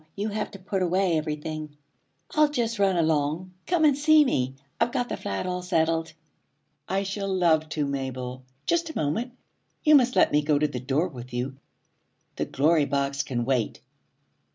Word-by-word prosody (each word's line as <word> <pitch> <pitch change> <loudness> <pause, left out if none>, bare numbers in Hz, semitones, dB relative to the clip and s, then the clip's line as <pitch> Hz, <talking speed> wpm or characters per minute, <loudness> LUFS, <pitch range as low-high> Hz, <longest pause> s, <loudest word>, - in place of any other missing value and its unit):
You 205 +2 -2
have 210 0 -3
to 200 - -10
put 195 0 -3
away 185 0 +2
everything. 155 -1 -4 0.5
I'll 305 -1 +4
just 235 -6 -1
run 195 -2 +3
along. 160 +2 0
Come 345 -3 +3
and 290 -3 +5
see 305 +1 +5
me. 130 - 0 0.2
I've 235 +1 +2
got 245 -2 -1
the - - -2
flat 100 - -4
all 180 0 -2
settled.' 165 -2 0 0.8
'I 195 +2 0
shall 195 0 -3
love 165 -4 +2
to, 150 -2 -1
Mabel. 130 -2 -4 0.2
Just 340 -1 +1
a 315 - -6
moment! 225 - -1 0.5
You 305 - +5
must 255 -3 +5
let - - +5
me 150 - +3
go 150 0 +2
to 150 +1 +2
the 130 -4 -5
door 140 +7 0
with 125 -6 -10
you. 130 +2 -2 0.8
The - - 0
Glory 155 +2 +2
Box 140 0 0
can 120 -3 -2
wait.' 125 -4 0
165 Hz, 175 wpm, -26 LUFS, 140-205 Hz, 0.8 s, and